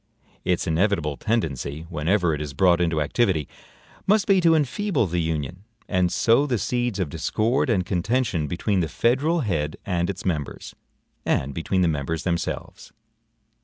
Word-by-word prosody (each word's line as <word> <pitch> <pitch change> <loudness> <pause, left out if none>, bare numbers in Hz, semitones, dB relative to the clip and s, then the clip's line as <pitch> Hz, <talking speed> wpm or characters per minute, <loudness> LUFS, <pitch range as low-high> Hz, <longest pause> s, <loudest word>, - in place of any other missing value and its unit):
Its 90 -1 0
inevitable 80 -3 +1
tendency, 80 - -2
whenever 85 +2 +1
it 75 - -3
is 70 -2 -6
brought 90 +2 +4
into 80 -2 +1
activity, 80 - +1 0.6
must 205 0 +4
be 195 -2 +4
to 165 -1 +5
enfeeble 155 - +1
the 90 -1 -1
Union, 80 +3 -3 0.2
and 90 -2 +1
sow 120 +9 +3
the 125 -4 +1
seeds 120 0 -1
of 95 -4 0
discord 110 - 0
and 95 -6 +2
contention 95 -3 0
between 95 +5 0
the 80 -3 0
federal 140 - +1
head 75 - -1
and 90 -2 0
its 100 +1 -5
members, 80 -6 -3 0.5
and 70 +1 0
between 95 +4 0
the 90 - +3
members 80 +1 -2
themselves. 85 -2 -3
90 Hz, 155 wpm, -24 LUFS, 80-115 Hz, 0.6 s, to